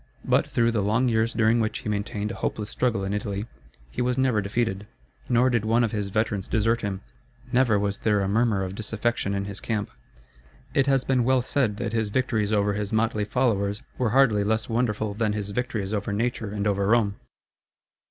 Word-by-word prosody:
But - - +2
through 115 0 +2
the 110 -3 0
long 115 +6 +2
years 115 0 +1
during 115 +1 +3
which 110 -1 0
he - - -8
maintained 105 0 -2
a - - -8
hopeless 105 -1 -2
struggle 115 -6 0
in 95 +1 -2
Italy 105 0 -3 0.5
he - - -3
was 125 +1 0
never 130 -5 +2
defeated. 100 0 -2 0.4
Nor 125 +1 +4
did 120 -3 +1
one 115 +2 +3
of 115 - 0
his 105 -3 -2
veterans 105 -1 -1
desert 115 +1 +1
him; 100 -2 -3 0.5
never 120 -4 +4
was 100 0 -1
there 105 -2 +2
a 95 - 0
murmur 110 -1 +2
of 95 0 -4
disaffection 110 0 -1
in 100 0 -2
his 100 0 -5
camp. 105 - -3 0.8
It 135 0 +2
has 135 -2 +3
been 130 -2 +2
well 130 0 +3
said 125 -6 0
that 115 -1 -3
his 110 -2 0
victories 110 -3 0
over 105 -1 +2
his 105 0 -3
motley 110 -1 +1
followers 105 -3 0 0.2
were 125 -3 +2
hardly 115 -4 +4
less 110 +2 0
wonderful 110 -3 -1
than 105 0 0
his 105 -1 -4
victories 110 -3 -2
over 105 0 -2
nature 115 0 -1
and 100 0 -3
over 100 -1 +1
Rome. 105 -3 +2
110 Hz, 200 wpm, -25 LUFS, 100-120 Hz, 0.8 s, Nor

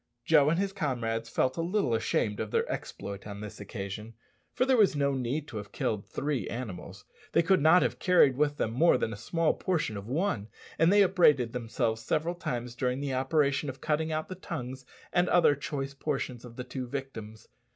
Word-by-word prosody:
Joe 150 -2 +5
and 165 - +2
his 195 +1 -1
comrades 115 - -2
felt 130 +2 0
a - - 0
little 175 - 0
ashamed 110 -2 0
of 110 - -3
their - - 0
exploit 100 +1 -6
on 100 -1 -7
this 105 -1 -8
occasion, 105 +2 -6 0.4
for 255 - +1
there 265 -1 +4
was 210 -9 +4
no 140 -1 +1
need 135 +4 -2
to 110 - -6
have 105 -1 -7
killed 105 -2 -2
three 145 -3 -2
animals 100 -5 -7 0.3
they 170 - +4
could 185 +1 +3
not 160 +4 +6
have - - -1
carried 180 -8 +5
with 145 +1 +1
them 110 - -1
more 160 +9 +4
than 115 - -2
a - - -5
small 165 - 0
portion 165 - -1
of 100 +1 -8
one 130 - -1 0.3
and 165 +3 +5
they 205 0 +6
upbraided 150 -11 +4
themselves 115 -1 -1
several 160 +8 0
times 125 -8 -4
during 125 +1 -1
the 140 -1 -2
operation 140 +2 +1
of 130 +1 -7
cutting 155 +2 0
out 155 0 -2
the - - -6
tongues 130 -7 -6 0.3
and 175 0 +3
other 175 -4 +5
choice 140 -1 -4
portions 135 -4 -3
of 120 -2 -11
the 125 - -5
two 125 0 -5
victims. 115 -5 -7
135 Hz, 205 wpm, -29 LUFS, 115-160 Hz, 0.4 s, not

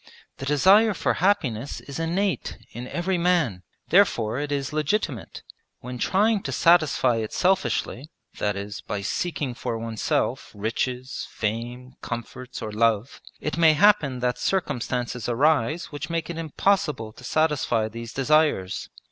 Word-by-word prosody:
The 135 - -6
desire 195 +9 +5
for - - +1
happiness 145 - +1
is 140 +2 -8
innate 180 +4 -1
in 120 +1 -7
every 175 +5 -1
man; 170 - +1 0.3
therefore 130 - +3
it 145 0 -3
is 140 0 -2
legitimate. 155 - -2 0.4
When 125 0 -7
trying 210 - +2
to - - -4
satisfy 155 -8 +4
it 110 -1 -3
selfishly 180 -6 0 0.3
that 105 -1 0
is, 100 +1 -6
by 105 - -4
seeking 145 - -2
for 120 -1 -3
oneself 115 -1 -1
riches, 125 +5 -3
fame, 120 +4 -4
comforts, 125 +2 -6
or 110 - -4
love 110 +2 +1 0.2
it 150 - -3
may 160 -2 +7
happen 155 -8 +4
that 125 -1 0
circumstances 125 - -1
arise 150 +4 +1
which 145 +2 -6
make 165 0 -2
it 165 - -7
impossible 155 - 0
to 125 - -15
satisfy 130 -6 +1
these 115 +1 -7
desires. 135 -9 +1
135 Hz, 140 wpm, -25 LUFS, 115-165 Hz, 0.4 s, may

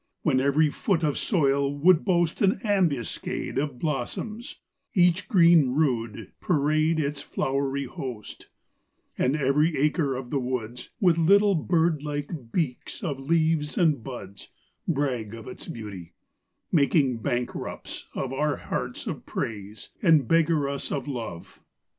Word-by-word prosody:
When 130 -5 +3
every 140 +3 +3
foot 175 0 0
of 150 -3 0
soil 140 - +2
would 165 +3 +5
boast 175 -4 +1
An 195 0 +3
ambuscade 180 - -1
Of 140 -3 -2
blossoms; 165 - -4 0.4
each 180 0 +3
green 170 - +5
rood 120 -8 -1
parade 155 0 +2
Its 145 -1 -2
flowery 140 -1 -1
host; 125 -4 -7 0.7
And 130 +3 +1
every 150 +3 +2
acre 145 -1 +1
of 125 -1 -6
the 140 - +1
woods, 125 -1 -4
With 175 -6 +3
little 200 +5 +5
bird 165 -2 +1
like 145 -4 -5
beaks 155 - -3
of 145 -7 -2
leaves 155 +1 +1
and 155 -9 +2
buds, 100 -7 -8 0.4
Brag 130 - -1
of 115 - -10
its - - -9
beauty; 100 -7 -8 0.6
making 140 -5 +3
bankrupts 125 -2 -4
of 135 -1 -3
Our 150 +1 0
hearts - - -4
of - - -6
praise, 105 -1 -5
and 160 - +4
beggar 165 -3 +3
us 140 0 -4
of 135 -2 -3
love. 115 -11 -6
145 Hz, 135 wpm, -26 LUFS, 130-165 Hz, 0.7 s, would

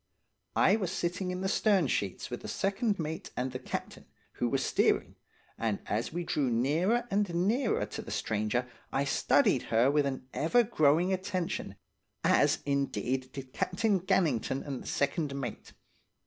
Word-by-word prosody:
I 200 - +5
was 190 -5 -2
sitting 180 +1 -2
in 180 0 -3
the 190 - 0
stern 195 -3 +3
sheets 100 -7 -2
with - - -4
the - - -7
second 200 +2 0
mate 160 -1 -4
and 125 +1 -1
the 130 - -5
captain, - - -6 0.2
who 120 - -1
was 135 +1 0
steering, - - +2 0.5
and 110 -3 0
as 110 +3 -1
we 175 +2 -3
drew 145 -5 0
nearer 165 - +1
and 200 -2 +1
nearer 230 +3 +1
to - - -6
the - - -10
stranger 110 +3 -1 0.2
I 135 - +1
studied 140 - +3
her 120 +4 +4
with 145 -1 +2
an 130 -1 -4
ever 205 +11 +3
growing 170 -3 +3
attention, 185 -2 -3 0.5
as, - - +3
indeed, 135 -2 -1
did 130 -1 -8
Captain 200 +1 +1
Gannington 170 - +1
and 135 -3 -4
the - - -10
second 140 0 0
mate. 120 -5 -6
155 Hz, 160 wpm, -30 LUFS, 130-190 Hz, 0.5 s, I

